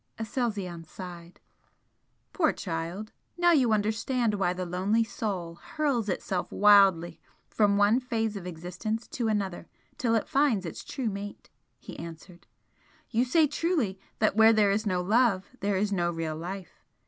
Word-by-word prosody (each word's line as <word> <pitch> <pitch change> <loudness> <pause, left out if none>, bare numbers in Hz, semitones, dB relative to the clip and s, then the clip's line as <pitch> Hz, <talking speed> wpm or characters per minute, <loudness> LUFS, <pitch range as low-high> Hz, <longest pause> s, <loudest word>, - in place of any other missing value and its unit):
Aselzion 210 -7 -3
sighed. 175 0 -10 0.9
"Poor 320 -5 +3
child! 175 +4 -5 0.3
Now 350 0 +4
you 265 -8 +4
understand 220 +2 +1
why 195 -3 +1
the 180 0 -3
lonely 190 +6 +1
Soul 180 -7 -4
hurls 275 -9 -1
itself 185 -1 -2
wildly 195 -5 +5 0.3
from 205 -2 +2
one 205 +4 +4
phase 225 -4 -2
of 185 -3 -6
existence 180 +7 -4
to 235 -3 -2
another 195 -5 -2 0.3
till 235 -5 +2
it 220 - 0
finds 270 -9 +2
its 165 - -6
true 250 -6 -3
mate!" 200 +1 -8 0.3
he - - -10
answered 170 +2 -10 0.6
"You 235 +2 +2
say 310 +5 +4
truly 295 - -1 0.2
that 215 -2 +2
where 220 +1 +7
there 210 -2 +4
is 215 +2 0
no 180 -2 +1
love 205 -1 +2
there 200 0 0
is 205 +2 0
no 175 -2 +1
real 165 -2 -3
life. 180 +3 -7
205 Hz, 150 wpm, -28 LUFS, 180-225 Hz, 0.9 s, where